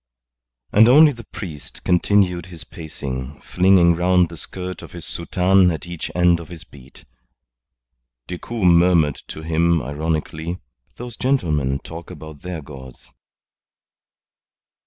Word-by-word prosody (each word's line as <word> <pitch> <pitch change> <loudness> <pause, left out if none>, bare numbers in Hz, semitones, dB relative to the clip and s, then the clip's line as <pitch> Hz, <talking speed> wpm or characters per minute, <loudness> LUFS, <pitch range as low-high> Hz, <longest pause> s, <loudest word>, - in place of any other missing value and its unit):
And 110 +3 +6
only 150 +4 +7
the 115 -4 -11
priest 85 -9 -9
continued 90 0 +2
his 85 -3 -10
pacing, 70 -3 -7
flinging 90 -2 +3
round 90 0 +2
the 85 - -9
skirt 90 +3 -6
of - - -12
his 85 -2 -8
soutane 90 +2 +2
at 80 +2 -5
each 85 -2 -6
end 90 -1 +3
of 85 - -10
his 85 -3 -9
beat. 70 -1 -17 1.2
Decoud 95 +4 -4
murmured 85 -4 +4
to 80 - -8
him 85 +1 +2
ironically: 80 +4 -3 0.4
"Those 120 -1 -8
gentlemen 75 - 0
talk 85 0 -9
about 80 -4 -11
their 90 -4 -6
gods." 65 -3 -13
85 Hz, 125 wpm, -21 LUFS, 80-90 Hz, 1.2 s, only